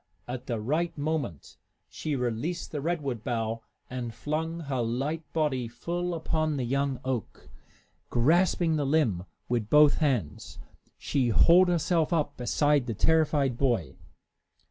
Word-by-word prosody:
At 125 0 -6
the 115 -3 -2
right 155 +11 -1
moment 145 - -3 0.3
she 150 -2 -4
released 125 +8 -2
the 150 - -3
redwood 140 -8 -2
bough 115 -1 -2 0.3
and 125 -2 -5
flung 160 +6 -3
her 135 -5 -2
light 135 +8 -2
body 145 -7 0
full 170 +9 -3
upon 155 -2 -1
the 130 - -1
young 135 +1 -1
oak. 130 -4 -4 0.6
Grasping 165 +5 +3
the 145 - 0
limb 120 - +1 0.2
with 115 -3 -1
both 150 -1 +6
hands, 120 - -1 0.4
she 130 -4 0
hauled 175 - +6
herself 170 -2 +1
up 160 -3 0
beside 145 +2 +1
the 115 - -2
terrified 145 -3 +2
boy. 115 - 0
140 Hz, 135 wpm, -28 LUFS, 120-160 Hz, 0.6 s, both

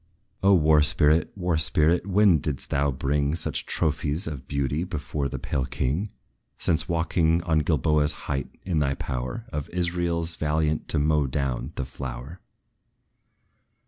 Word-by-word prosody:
O 100 0 +5
War 75 -2 +5
spirit! 75 +2 +3
War 90 -4 0
spirit, 80 +4 +3
when 100 -4 +4
didst 70 -1 -2
thou 70 0 +1
bring 70 +3 0
Such - - -1
trophies 75 +2 0
of 70 -5 -6
beauty 70 +2 -1
before 75 -5 -3
the - - -5
pale 65 -2 -2
king, 80 +11 -2 0.5
Since 80 - 0
walking 85 0 +1
on 80 -3 +2
Gilboa's 75 0 +1
height, 70 -3 -2 0.2
in 90 -4 0
thy 70 -2 0
power, 65 - -4
Of 75 -1 -4
Israel's 85 -1 -1
valiant 75 0 0
to - - 0
mow 75 -1 +2
down 65 +1 -2
the 70 - -3
flower? 65 +4 -7
75 Hz, 145 wpm, -25 LUFS, 70-85 Hz, 0.5 s, O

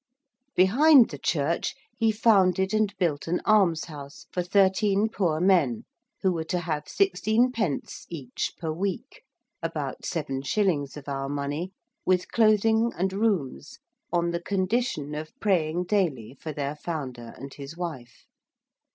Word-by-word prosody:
Behind 250 - +6
the 145 - -7
church 160 - 0 0.2
he 225 -1 +2
founded 190 -3 +3
and 215 -2 +2
built 165 -6 -1
an 175 +2 0
almshouse 165 -8 +1
for 180 - -1
thirteen 200 +3 +3
poor 170 -8 0
men, 170 - +3 0.4
who 190 - +4
were 165 -2 -2
to 180 - -1
have 155 -3 -3
16_d._ 215 - 0
each 135 -7 -4
per 160 -2 -3
week, 185 +3 -4 0.4
about - - -4
7_s._ 145 +2 -1
of 145 - -10
our 135 -1 -3
money, 145 +5 -3 0.3
with 180 -1 +1
clothing 220 +1 +3
and 190 +2 0
rooms 190 - -1 0.3
on 170 0 +1
the 170 0 -2
condition 190 - -1
of 155 - -7
praying 175 -4 +1
daily 170 - 0
for 155 +3 -7
their 145 0 -3
founder 135 -7 -6
and 135 +1 -9
his 140 +3 -9
wife. 145 -9 -7
175 Hz, 135 wpm, -26 LUFS, 145-200 Hz, 0.4 s, Behind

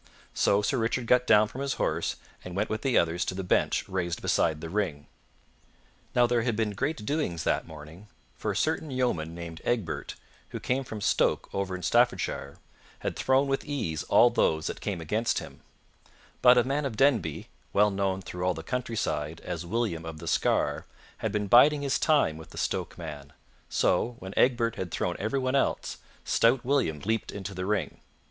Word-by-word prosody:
So 100 +1 +2
Sir 100 +6 +1
Richard 115 +2 0
got 125 +1 +3
down 105 0 +6
from 130 - -7
his 140 -1 -1
horse - - -1 0.3
and 90 -1 -7
went 105 +3 -1
with 110 0 -2
the 130 -3 +2
others 85 +1 +2
to 95 - -3
the 95 - -3
bench 90 - +1
raised 90 -3 -2
beside 80 -2 +1
the 80 - -6
ring. 85 -6 -2 1.1
Now 125 - +6
there 120 -1 +2
had 120 -1 0
been 110 -1 0
great 130 +2 -2
doings 140 - -1
that - - 0
morning, 80 +5 -11 0.3
for 105 - -4
a 100 - -1
certain 155 +6 0
yeoman 120 - -1
named 85 -1 -8
Egbert, 105 -10 -2 0.3
who - - -5
came 130 +2 -1
from 110 -4 -7
Stoke - - +1
over 95 -1 -2
in 90 - -7
Staffordshire, 70 -3 +1 0.4
had - - -2
thrown 135 +1 +2
with 135 0 0
ease 110 - -3
all - - +5
those 80 -1 +1
that - - -4
came 95 -5 -3
against 110 +8 0
him; - - -7 0.8
but 125 0 +7
a 120 - +5
man 140 +4 -1
of 120 -6 -4
Denby, 115 - +1 0.2
well 105 +1 +4
known 95 -1 -1
through 90 0 -6
all 90 -1 +1
the 80 - -7
countryside 85 -10 -2
as 85 -1 -5
William 105 -5 -1
of 80 -1 -7
the - - -9
Scar, 70 - +1 0.3
had - - -2
been 105 -1 -1
biding 140 +7 +6
his 140 -1 +1
time 145 - +3
with 80 - -11
the - - -13
Stoke - - -2
man; 75 -3 -8 0.4
so, 120 +1 +1
when 95 -1 -8
Egbert 120 -2 +2
had 95 - -3
thrown 90 +1 -2
everyone 130 +4 -1
else, 140 - 0 0.3
stout 120 +2 +3
William 125 - +1
leaped 110 +2 -1
into 100 0 -6
the 90 0 -4
ring. 105 -1 -1
105 Hz, 190 wpm, -28 LUFS, 85-125 Hz, 1.1 s, but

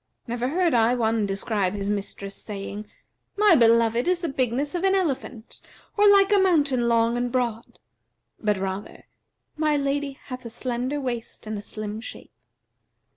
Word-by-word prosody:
Never 240 +1 -2
heard 340 +3 +1
I 235 +1 +4
one 225 -3 +1
describe 195 -1 -1
his 200 -1 -3
mistress, 200 -1 -4
saying, 205 0 -7 0.5
'My 420 -2 +6
beloved 230 0 +4
is 365 0 +3
the 340 - -2
bigness 265 +2 -1
of 355 0 -2
an 385 0 +3
elephant 270 - -3 0.3
or 415 0 +5
like 400 0 +5
a 405 - +5
mountain 290 -10 +2
long 230 0 +2
and 245 0 -1
broad;' 235 -2 -2 0.6
but 210 -2 0
rather, 190 +1 -5 0.5
'My 305 -1 +2
lady 280 0 -1
hath 255 -1 -9
a 235 - -7
slender 250 +4 -3
waist 240 -5 -5
and 215 0 -4
a 205 - -5
slim 215 +1 -6
shape.' - - -10
240 Hz, 160 wpm, -24 LUFS, 215-285 Hz, 0.6 s, My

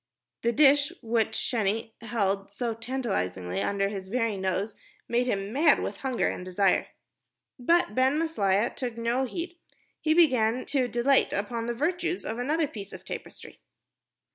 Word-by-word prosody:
The 235 - +2
dish 285 +1 +5
which 225 -1 +1
Sheni 225 -1 -1
held 200 -4 -1
so 230 +3 -2
tantalizingly 195 - -2
under 195 - +1
his 195 -2 -6
very 230 -1 0
nose 190 +2 -2 0.3
made 245 +1 +1
him 200 -2 -2
mad 290 +2 +5
with - - -4
hunger 260 -3 0
and - - -3
desire. 185 +1 +2 0.7
But 335 -2 +3
Ben 260 +4 +3
Maslia 225 -10 +1
took 240 -3 -4
no 235 +3 0
heed. 345 +6 -6 0.4
He 315 0 +2
began 255 -7 +3
to 265 -3 +1
dilate 250 +3 +3
upon 230 +3 -2
the 240 - -2
virtues 350 +6 -1
of 225 +2 -3
another 300 +5 +1
piece 205 -6 -9
of - - -10
tapestry. - - -8
235 Hz, 150 wpm, -27 LUFS, 200-270 Hz, 0.7 s, dish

